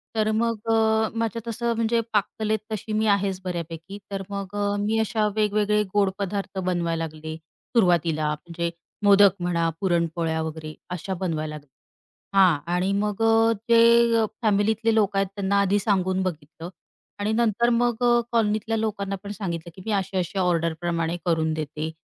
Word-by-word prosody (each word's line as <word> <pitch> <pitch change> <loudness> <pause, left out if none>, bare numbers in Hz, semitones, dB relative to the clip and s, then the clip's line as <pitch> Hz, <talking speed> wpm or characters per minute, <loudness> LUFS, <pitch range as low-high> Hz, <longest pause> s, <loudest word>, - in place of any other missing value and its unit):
तर 215 -1 +1
मग 225 0 -1
अ, 220 0 +3
माझ्या 230 0 -2
तसं 235 +1 -1
म्हणजे 230 +1 +1
पाककलेत 215 +1 0
तशी 215 +1 -4
मी 215 +1 +1
आहेच 195 -1 -3
बऱ्यापैकी. 170 +1 -5
तर 195 -1 -3
मग 200 0 -5
अ, 205 0 0
मी 215 +2 0
अशा 220 -1 +1
वेगवेगळे 210 0 +2
गोड 200 -2 +4
पदार्थ 200 0 -3
बनवायला 170 -3 -1
लागले, 155 0 -7 0.4
सुरुवातीला. 170 -7 +2
म्हणजे 170 +2 -4 0.3
मोदक 200 -1 +6
म्हणा, 170 -2 0
पुरणपोळ्या 170 -3 0
वगैरे 155 -1 -6 0.2
अशा 180 +2 -4
बनवायला 155 -4 -3
लागल्या. 145 -2 -12 0.7
हां 180 -6 +5 0.2
आणि 185 +2 +1
मग 210 +1 -1
अ, 225 0 +4 0.2
जे 230 -1 +5 0.2
फॅमिलीतले 220 +2 +2
लोक 205 -2 +2
आहेत 195 -1 +2
त्यांना 200 0 +1
आधी 200 +1 +2
सांगून 190 -2 +1
बघितलं 165 -1 -6 0.5
आणि 205 +2 0
नंतर 235 0 +2
मग 240 0 +1
अ, 240 0 +5
कॉलनीतल्या 220 0 +1
लोकांना 200 -2 -2
पण 205 - -6
सांगितलं 170 -4 -5
की, 190 - -11
"मी 220 - -2
अशा-अशा 190 -1 -1
ऑर्डर 170 -2 +1
प्रमाणे 170 -1 -1
करून 160 -2 +1
देते, 155 0 -4
200 Hz, 155 wpm, -24 LUFS, 170-220 Hz, 0.7 s, मोदक